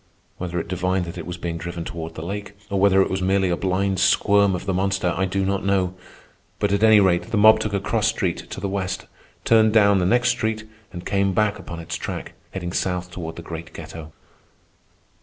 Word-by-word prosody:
Whether 90 -1 -3
it - - -5
divined 90 +1 -1
that 85 +1 -7
it 85 - -7
was 90 0 -5
being 85 -1 -4
driven 85 0 -5
toward 80 -1 -6
the 80 - -6
lake, 100 +2 -6
or 100 - +1
whether 95 0 +5
it - - -3
was 95 0 -1
merely 95 0 +2
a - - +2
blind 95 +1 0
squirm 100 +1 +4
of 90 - -6
the 95 - 0
monster, 95 -1 0
I 95 +2 +1
do 95 +1 -1
not 100 0 -1
know; 95 -2 +1 0.6
but 105 - 0
at 100 +1 +1
any 110 -1 +7
rate 95 +1 +2
the 115 - 0
mob 110 +1 +7
took 110 - -3
a 100 - +1
cross 95 - 0
street - - -2
to - - -6
the 100 - -2
west, 95 -1 -3 0.4
turned 110 -1 +5
down 100 -3 +5
the 90 - +1
next 120 +4 +3
street, 110 -2 -1 0.2
and 90 0 -8
came 100 -1 +1
back 105 +1 +1
upon 85 -1 -8
its 80 - -5
track, - - -6 0.2
heading 90 -2 -5
south 90 -1 -2
toward 80 -3 -6
the 85 - -8
great 85 0 -8
ghetto. 80 -1 -9
95 Hz, 220 wpm, -23 LUFS, 90-100 Hz, 0.6 s, any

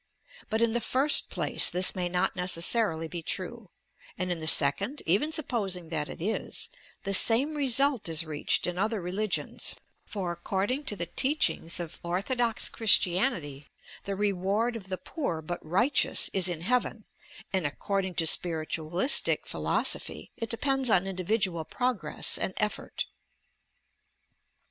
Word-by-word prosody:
But, 220 +1 0
in 230 -1 +1
the 240 - -1
first 270 +6 +2
place - - +2
this 180 +1 +3
may 180 -2 -3
not 180 0 -1
necessarily 180 -1 +2
be 170 +1 -7
true; 200 +5 -5 0.5
and 180 0 -3
in 175 - -3
the 155 - -4
second, 195 - +5
even 205 - +1
supposing 200 - -2
that 150 -2 -3
it - - -9
is, 210 +7 -3 0.3
the 195 - -3
same 240 +9 +7
result 275 - +3
is 165 +1 +3
reached 150 -2 -2
in 180 0 -4
other 215 +1 -1
religions, 190 +3 -3 0.3
for 190 -4 -5
according 200 - -3
to 210 - -2
the 175 - -4
teachings 260 - 0
of 170 -2 -8
ortho 185 +9 -3
dox 235 -2 +1
Christianity 180 - 0 0.4
the 195 - -4
reward 205 +4 -1
of 195 -4 -9
the 185 - -4
poor 185 - -5
but 165 +3 -7
righteous 215 - +2
is 190 -2 +4
in 170 -2 -5
Heaven, 230 +1 -2 0.5
and 185 -6 0
according 190 +4 -4
to 165 - +1
spiritualistic 165 - +2
philosophy - - -2
it 230 -2 -6
depends 270 +2 +1
on 190 -3 +2
individual 185 -2 -2
progress 215 -5 -2
and 190 - -4
effort. 210 -1 -3
190 Hz, 145 wpm, -27 LUFS, 175-230 Hz, 0.5 s, same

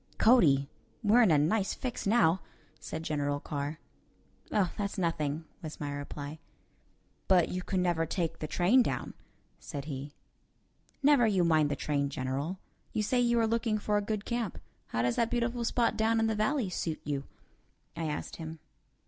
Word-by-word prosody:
"Cody, 155 - +5 0.4
we're 220 +4 +6
in 220 - +5
a 155 - +5
nice 190 +8 +1
fix 250 -4 -4
now," 190 -5 +4 0.4
said 160 - -5
General 145 -2 -1
Carr. 145 +1 -4 0.7
"Oh, 195 -4 +2
that's 200 0 -3
nothing," 160 -3 -1 0.2
was 155 -3 -7
my 145 -1 -3
reply. 145 +1 -6 0.9
"But 180 -3 +4
you 185 - -3
can 185 0 -1
never 165 -2 +1
take 170 -2 -2
the 155 - -3
train 185 +12 +4
down," - - -2 0.5
said 140 -4 -6
he. 140 -1 -6 0.9
"Never 280 -5 +6
you 190 -4 +3
mind 155 -3 +3
the 145 - 0
train, 140 -1 -1
General. 140 +6 -3 0.4
You 215 - 0
say 250 +4 +1
you 235 -1 +3
are - - +3
looking 225 -1 +1
for 210 0 -1
a - - +1
good 210 0 -3
camp. 235 -5 -2 0.3
How 115 - -1
does 120 0 +1
that 230 -1 +2
beautiful 240 0 -1
spot 235 0 +1
down 225 +1 +2
in 225 - +2
the 220 - +1
valley 215 0 0
suit 165 -3 -3
you?" 140 -2 -3 0.7
I 165 -1 -3
asked 150 -1 -4
him. 160 -1 -6
175 Hz, 175 wpm, -30 LUFS, 150-220 Hz, 0.9 s, we're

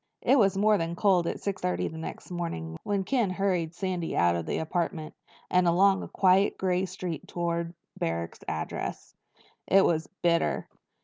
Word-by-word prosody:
It 270 - +5
was 195 -3 +3
more 210 +1 +4
than 165 +1 -2
cold 180 -3 +3
at - - -3
six 195 -2 -3
thirty 90 0 0
the 160 - -7
next 160 - -7
morning 125 - -4
when 200 -1 -1
Ken 235 -1 +1
hurried 185 -3 -1
Sandy 180 -3 -2
out 85 0 +4
of 85 -1 -3
the - - -1
apartment 160 -1 -2 0.4
and 180 -1 +4
along 190 +3 +4
quiet 190 +1 +3
gray 185 0 0
streets 180 -2 -5
toward 170 0 -2 0.2
Barrack's 85 0 -2
address. 80 0 -4 0.5
It 195 0 +5
was 160 -1 +1 0.2
bitter. 170 -1 +1
175 Hz, 165 wpm, -28 LUFS, 160-190 Hz, 0.5 s, It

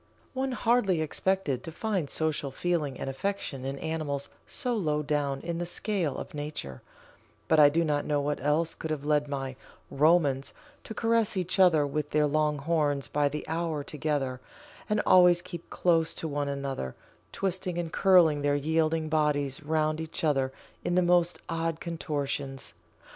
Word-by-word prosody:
One 265 0 -1
hardly 225 -8 +2
expected 155 -3 0
to 165 - -7
find 190 -4 -2
social 155 -3 -1
feeling 150 -2 -1
and - - -4
affection 135 -1 -3
in 135 +1 -3
animals 150 -3 -3 0.2
so 250 -3 -2
low 155 -9 0
down 140 -2 -1
in 170 0 -3
the 175 - -2
scale 175 -4 -1
of - - -7
nature, 145 - -5 0.7
but 160 - +4
I 145 -1 +9
do 165 +3 +1
not 145 -2 0
know 145 -1 +1
what 145 0 -2
else 150 +4 +1
could 160 - -6
have 150 -2 -3
led 150 -1 +2
my 135 -2 -4 0.4
"Romans" 145 -3 +2 0.3
to 220 - -7
caress 230 -3 +1
each 185 +1 -1
other 165 -6 +6
with 145 +1 -2
their 150 0 +3
long 150 0 +1
horns 145 -2 0
by 145 -1 +1
the 150 +1 -5
hour 160 -2 -2
together 140 -4 -2 0.5
and 210 0 +2
always 180 -1 +6
keep 175 -2 -9
close 165 -2 +1
to 160 - -4
one 145 -1 -2
another, 140 - -4 0.4
twisting 185 -2 -2
and 170 -2 -3
curling 175 -6 +5
their 145 0 +2
yielding 160 +2 +1
bodies 150 -3 0
round 155 0 0
each 160 +1 -5
other 135 -4 +2 0.3
in 175 - 0
the 180 - +4
most 175 0 +3
odd 165 -1 -2
contortions. 140 - -3
155 Hz, 165 wpm, -28 LUFS, 145-175 Hz, 0.7 s, I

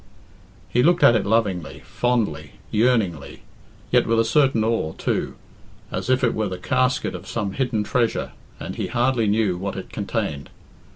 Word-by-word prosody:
He 120 +7 +1
looked 175 +5 +3
at 120 - +7
it 105 -3 0
lovingly, 90 -10 0
fondly, 100 -7 -1 0.2
yearningly, 110 - 0 0.5
yet - - +3
with 115 0 +2
a 115 - +3
certain 130 -2 +3
awe, 110 -8 0
too, - - -2 0.6
as - - -4
if 130 0 +2
it 120 - +3
were 110 -2 -1
the 90 - -5
casket 130 +6 0
of 90 +1 -8
some 105 -4 -2
hidden 125 -3 -1
treasure, 115 +2 0 0.3
and - - -6
he - - -2
hardly 120 -2 +1
knew 100 -3 +1
what 100 +1 -4
it 95 - -7
contained. 100 -9 -3
110 Hz, 165 wpm, -23 LUFS, 95-120 Hz, 0.6 s, at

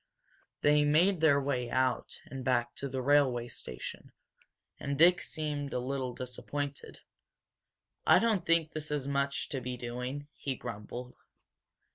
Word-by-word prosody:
They 150 0 +5
made 165 +5 +4
their 145 -3 +5
way 130 -3 -1
out 130 0 0
and 130 0 -7
back 120 -2 +1
to 140 - -4
the 130 -1 -3
railway 130 -4 +3
station. 60 - -7 0.7
And 140 0 -2
Dick 175 +3 +6
seemed 145 -2 -3
a - - 0
little 130 -1 -3
disappointed. 140 +3 -5 1.1
"I - - +8
don't 220 -6 +2
think 165 -2 +2
this 155 0 -4
is 145 -2 -2
much 140 0 -1
to 135 -4 -3
be 125 0 -4
doing!" 125 +4 -5
he 135 -2 -3
grumbled. 120 +2 -7
140 Hz, 140 wpm, -31 LUFS, 125-150 Hz, 1.1 s, I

